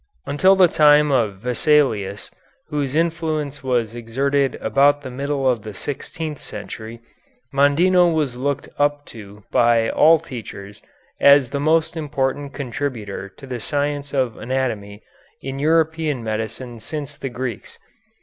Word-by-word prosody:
Until 185 +7 +4
the 185 -2 +6
time 150 -2 +5
of 110 -7 0
Vesalius, 125 - +1 0.4
whose 145 -2 -2
influence 160 -3 -1
was 120 -4 0
exerted 135 +4 0
about 145 +1 +3
the 130 - -6
middle 140 +1 -2
of 120 -4 +1
the 105 -1 -9
sixteenth 150 - -5
century, 110 +2 -8 0.5
Mondino 170 +6 +4
was 150 -6 -1
looked 140 +2 -2
up 145 0 +1
to 105 -2 -12
by 115 -1 +3
all 160 +2 +6
teachers 110 -9 -9 0.4
as 140 -2 +6
the 140 - -2
most 160 +3 +2
important 145 -2 -2
contributor 120 -7 -5
to 135 - -14
the 125 -2 -5
science 145 +2 -2
of 130 -5 -1
anatomy 110 -5 -3 0.4
in 135 0 -6
European 160 -3 +1
medicine 110 +2 -4
since 145 +3 -6
the 135 - -5
Greeks. 125 -2 -6
140 Hz, 130 wpm, -21 LUFS, 120-150 Hz, 0.5 s, the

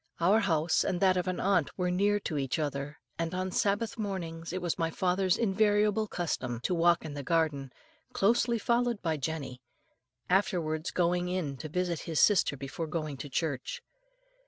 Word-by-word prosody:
Our 190 +6 +4
house 165 -6 +2
and 180 -2 -1
that 185 -1 +4
of 180 0 -1
an 185 - -1
aunt 190 -6 +1
were 180 -1 0
near 205 +3 +2
to 155 -6 -2
each 135 -1 -1
other, 145 -1 -3 0.2
and 165 +1 -2
on 185 0 -2
Sabbath 205 +4 0
mornings 170 -6 -4
it 185 - -2
was 175 -2 -2
my 165 -1 +1
father's 185 +2 +1
invariable 210 0 +2
custom 130 - -3
to 180 - 0
walk 170 -1 +3
in 150 - -5
the 145 - -5
garden, 145 -3 0 0.4
closely 235 +3 +2
followed 235 0 +1
by 160 -2 0
Jenny, 140 -3 -4 0.7
afterwards 175 -4 +1
going 175 0 +1
in 175 -7 -2
to 155 - -7
visit 175 0 -1
his 160 - 0
sister 190 -8 +4
before 140 +5 -5
going 155 -2 -3
to 145 +3 -7
church. 140 -3 -3
175 Hz, 175 wpm, -30 LUFS, 155-195 Hz, 0.7 s, Our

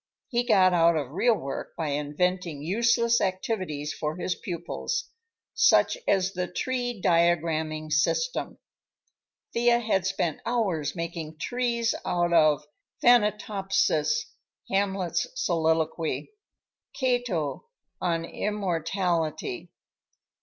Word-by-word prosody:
He 240 0 +1
got 190 -6 +4
out 170 -1 +4
of 140 -4 -3
real 230 +8 +3
work 135 -8 -6
by 160 -3 -2
inventing 150 +2 -1
useless 235 +5 +2
activities 185 -6 -2
for 150 +1 -3
his 180 0 -1
pupils, 175 - -4 0.4
such - - +4
as 190 -1 +2
the 180 -1 -2
"tree 245 -3 -2
diagramming 160 -3 +1
system." - - 0 1.0
Thea 235 0 +4
had 210 -6 0
spent 175 -5 -1
hours 190 -12 -1
making 165 -2 -5
trees 235 +3 0
out 175 -1 0
of 155 -3 +4 0.4
"Thanatopsis," 210 - +2 0.5
Hamlet's 195 -2 0
soliloquy, 160 - 0 0.6
Cato 245 - -1 0.3
on 165 -2 0
"Immortality." 185 - -2
180 Hz, 95 wpm, -27 LUFS, 160-230 Hz, 1.0 s, got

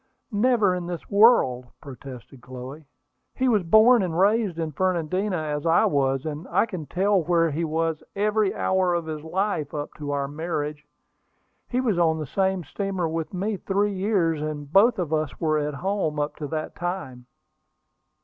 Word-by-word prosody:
"Never 215 -2 +3
in 180 -1 -4
this 175 -2 -7
world!" 200 - +4
protested 130 -2 -11
Chloe. 130 +5 -9 0.5
"He 260 - +1
was 220 -5 +3
born 220 +7 +6
and 170 -3 -2
raised 200 -1 +2
in 160 -2 -2
Fernandina, 185 +3 -1
as 150 -2 -3
I 165 0 +4
was; 135 -1 +1
and 155 +3 -5
I - - +2
can 185 -9 -7
tell 195 +1 +2
where 165 -1 +2
he 160 +4 -2
was 160 0 -1
every 210 0 +1
hour 185 -2 +1
of 170 -1 -2
his 155 -1 -5
life, 160 -2 -2
up 145 0 -5
to 145 -1 -5
our 140 -1 -1
marriage. 150 -1 -4 0.8
He 250 - 0
was 225 -9 +1
on 160 -2 +3
the 155 - -4
same 190 +4 0
steamer 190 +3 -3
with 160 0 -3
me 200 +3 -2
three 200 +2 0
years, 185 -6 0
and 150 -1 -5
both 225 +5 +5
of 170 -4 -2
us 155 -2 -2
were 155 -2 +1
at 150 -1 -3
home 180 -2 -1
up 145 0 -2
to 150 - -5
that 155 +1 -4
time." 175 -9 -5
165 Hz, 175 wpm, -24 LUFS, 150-195 Hz, 0.8 s, born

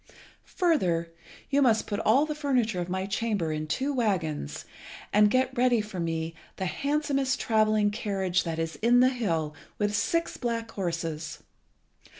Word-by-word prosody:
Further, 175 - +1 0.4
you 280 +1 +3
must 230 -5 +3
put 205 -1 -3
all 250 +7 +4
the 305 - -3
furniture 250 -10 0
of 175 - -4
my 190 +1 -1
chamber 200 -5 -1
in 155 0 -3
two 265 - -1
waggons, 180 - -1 0.5
and 210 0 +6
get 260 +3 +1
ready 245 -1 +3
for 210 -3 -5
me 165 -1 -2 0.2
the 190 - -3
handsomest 275 +3 0
travelling 215 -2 +2
carriage 195 -4 0
that 165 -2 -3
is 165 0 -3
in 240 +2 +4
the 255 - +6
hill, 165 -12 -1 0.2
with 205 0 0
six 225 +12 0
black 230 -2 -3
horses. 165 -5 -4
210 Hz, 155 wpm, -28 LUFS, 170-250 Hz, 0.5 s, and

